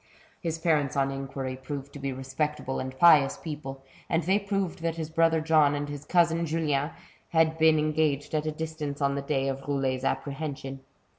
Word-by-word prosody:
His 165 -2 -2
parents, 150 -4 +1
on 135 0 +2
inquiry, 135 -1 -4
proved 140 +1 -7
to 145 - -8
be 135 0 -2
respectable 135 +1 -3
and 130 0 -5
pious 155 -5 +6
people, 135 -4 -7 0.3
and 165 0 +1
they 190 +5 +3
proved 195 -4 -2
that 165 -1 -1
his 160 -1 -5
brother 165 0 +3
John 155 -2 +4
and 145 0 -2
his 145 0 -7
cousin 170 -1 +3
Julien 150 -2 0 0.4
had 160 -1 +2
been 160 0 +6
engaged 150 -2 0
at 155 0 0
a - - +1
distance 155 -2 -4
on 140 -1 +2
the 140 - -2
day 135 -1 0
of 135 0 -2
Roulet's 135 -2 0
apprehension. 135 -1 -3
150 Hz, 180 wpm, -28 LUFS, 135-160 Hz, 0.4 s, pious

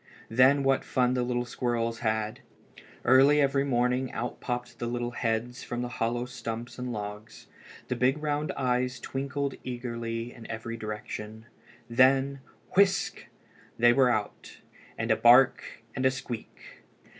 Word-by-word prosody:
Then 130 +4 +5
what 135 0 +2
fun 125 -1 +1
the 125 - 0
little 120 0 -1
squirrels 115 -2 -2
had! 110 -1 -1 0.7
Early 135 +4 +6
every 140 -1 +2
morning 125 -1 +1
out 120 +2 -4
popped 125 -1 -4
the 120 - -2
little 120 0 -2
heads 120 +1 -2
from 120 0 -4
the 125 - -4
hollow 120 +2 0
stumps 120 0 -6
and 125 0 -3
logs. 105 0 -7 0.4
The - - -1
big 130 +3 +2
round 150 0 -1
eyes 125 -1 0
twinkled 140 +1 -3
eagerly 120 -1 -4
in 115 - -12
every 115 +1 -5
direction. 110 0 -6 0.4
Then, 135 +3 +3 0.4
whisk! 195 0 +2 0.5
they 120 0 +6
were 130 0 +4
out, 110 -3 -3 0.4
with - - -1
a - - +5
bark 120 -1 +4
and 130 - -2
a 130 - +5
squeak! 130 -3 -8
125 Hz, 145 wpm, -28 LUFS, 115-130 Hz, 0.7 s, Early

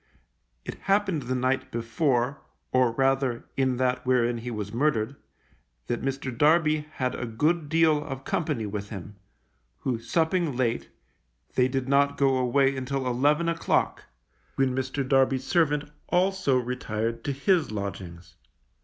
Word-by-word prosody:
It - - -4 0.2
happened 195 -5 +2
the 130 0 -2
night 130 +1 0
before, 125 +3 0 0.3
or 130 -2 +3
rather 135 -1 +1
in 130 -2 +1
that 125 0 0
wherein 120 -2 +2
he 120 +2 -6
was 105 -3 -5
murdered, 130 -2 +1 0.7
that 120 - -2
Mr. 135 -2 -3
Darby 155 +2 +3
had 130 -1 -1
a 120 - -4
good 150 +7 0
deal 160 -2 +3
of 135 -2 -6
company 150 -10 -1
with 100 0 -5
him, 100 0 -8 0.6
who 125 -4 -1
supping 160 +4 0
late, 120 -2 -1 0.6
they 125 -1 +3
did 130 0 -2
not 140 +1 +3
go 135 -2 +3
away 135 +2 +2
until 130 0 -3
eleven 145 +7 +2
o'clock, 165 0 0 0.5
when 135 -1 +1
Mr. 130 +1 -2
Darby's 135 -1 +3
servant 150 0 +2 0.3
also 180 -6 +2
retired 115 -2 -3
to 140 - 0
his 155 +4 +1
lodgings. 95 -4 -6
130 Hz, 140 wpm, -26 LUFS, 120-145 Hz, 0.7 s, or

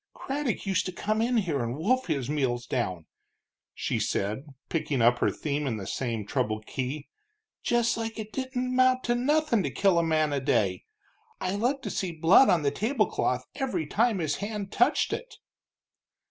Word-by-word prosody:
"Craddock 275 -5 -3
used 195 -1 +1
to - - -3
come 215 +4 -1
in 240 +1 +2
here 165 - 0
and 120 +3 -3
wolf 255 +11 +1
his 140 -7 -1
meals 130 -5 -1
down," 95 -10 -2 0.7
she - - -1
said, 105 +8 -1 0.2
picking 150 -4 -1
up 120 +1 +4
her - - +3
theme 145 -1 -2
in 115 -4 -1
the 95 - -6
same 115 -1 -3
troubled 110 +1 -1
key, 135 +3 -4 0.5
"just 240 -1 +1
like 225 -1 -4
it 215 -1 -6
didn't 260 -1 -2
amount 255 0 +3
to 240 - +1
nothing 285 -1 +2
to - - -1
kill 195 -4 +3
a - - +2
man 155 -2 +1
a 140 - +1
day. 100 -9 +1 0.5
I 185 0 -1
looked 250 +7 0
to - - -3
see 185 -3 -2
blood 165 +10 +6
on 165 -4 +3
the 140 - +2
tablecloth 220 - 0
every 250 - -2
time 220 +7 +2
his 155 -5 -1
hand 205 0 -4
touched - - +2
it." - - -6
175 Hz, 180 wpm, -28 LUFS, -, 0.7 s, blood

